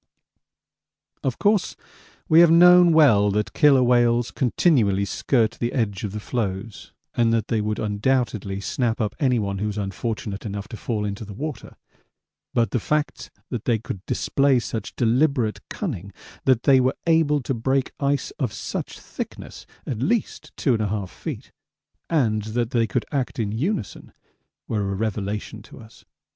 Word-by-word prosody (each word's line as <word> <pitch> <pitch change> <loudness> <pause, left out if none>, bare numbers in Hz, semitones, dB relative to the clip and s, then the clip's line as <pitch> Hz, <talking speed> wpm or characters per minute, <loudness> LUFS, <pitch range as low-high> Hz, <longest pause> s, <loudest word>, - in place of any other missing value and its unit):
Of 130 -3 -1
course, 205 -2 +1 0.5
we 160 - +6
have 170 -1 +8
known 175 +1 +7
well 120 -11 +5
that 105 +1 -1
killer 140 -4 +5
whales 120 -1 +3
continually 115 - +2
skirt 110 +3 +1
the 120 0 -1
edge 105 -5 -1
of 105 - -3
the 105 - -5
floes 105 -2 -4 0.2
and 115 -1 +2
that 115 -2 0
they 110 -2 +1
would 105 0 -2
undoubtedly 105 -2 -1
snap 120 +2 -1
up 110 -2 -1
anyone 110 -8 0
who 105 - -1
was 105 0 -4
unfortunate 105 +1 -4
enough 100 -1 -5
to - - -7
fall 110 -1 -3
into 100 +1 -4
the 105 -1 -9
water; 150 +4 -6 0.8
but 115 -1 +1
the 125 - +1
facts 150 +6 -2 0.2
that 120 -5 -4
they 120 -2 +2
could 100 -3 -7
display 140 -1 +2
such 115 -4 -4
deliberate 120 -1 +1
cunning, 100 - -5 0.3
that 130 -3 +3
they 135 -2 +5
were 130 +1 +1
able 160 -3 +3
to 135 - -1
break 130 +3 0
ice 140 0 0
of 125 -7 -1
such - - -5
thickness - - -8 0.2
(at 120 - -4
least 225 - -1
2 130 -5 +2
1/2 105 -2 -2
feet), - - -7 0.6
and 115 -10 +1
that 120 -1 0
they 115 -2 +2
could 95 - -1
act 135 -4 -2
in 110 -4 -1
unison, 125 - -3 0.5
were 105 -2 -1
a - - -2
revelation 105 0 -3
to - - -14
us. 110 -1 -16
115 Hz, 160 wpm, -23 LUFS, 105-135 Hz, 0.8 s, have